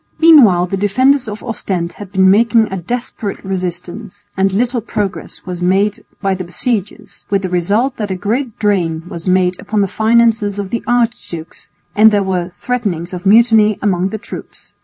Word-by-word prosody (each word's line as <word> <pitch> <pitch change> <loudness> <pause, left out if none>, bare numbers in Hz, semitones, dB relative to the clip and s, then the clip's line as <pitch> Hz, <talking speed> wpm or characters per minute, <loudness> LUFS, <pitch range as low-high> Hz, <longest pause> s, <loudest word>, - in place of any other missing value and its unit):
Meanwhile 250 - +6
the 195 +2 -3
defenders 255 +7 +2
of 210 0 -7
Ostend 190 -7 -3
had 200 -2 -10
been 190 -1 +3
making 225 0 +3
a - - -2
desperate 210 +1 -5
resistance, 180 -2 -5
and 195 0 +1
little 240 +4 0
progress 205 -3 -5
was 180 -1 -6
made 195 +3 +1 0.2
by 195 -1 +1
the 185 -1 -4
besiegers, 205 +1 -4
with 200 -1 0
the 185 - -2
result 205 +9 0
that 210 -2 -3
a 190 - -2
great 225 +6 -2
drain 175 -6 0
was 170 -1 -7
made 185 -1 +2
upon 215 -1 -1
the 200 - +1
finances 220 -1 +2
of 200 -1 -5
the 235 - -2
archdukes 235 -9 -2 0.3
and 215 +1 +7
there 205 -2 +1
were 185 -2 -2
threatenings 195 -9 -3
of 180 +1 -4
mutiny 220 -1 +5
among 190 -2 +1
the 220 - -4
troops. - - -11
200 Hz, 175 wpm, -16 LUFS, 185-225 Hz, 0.3 s, and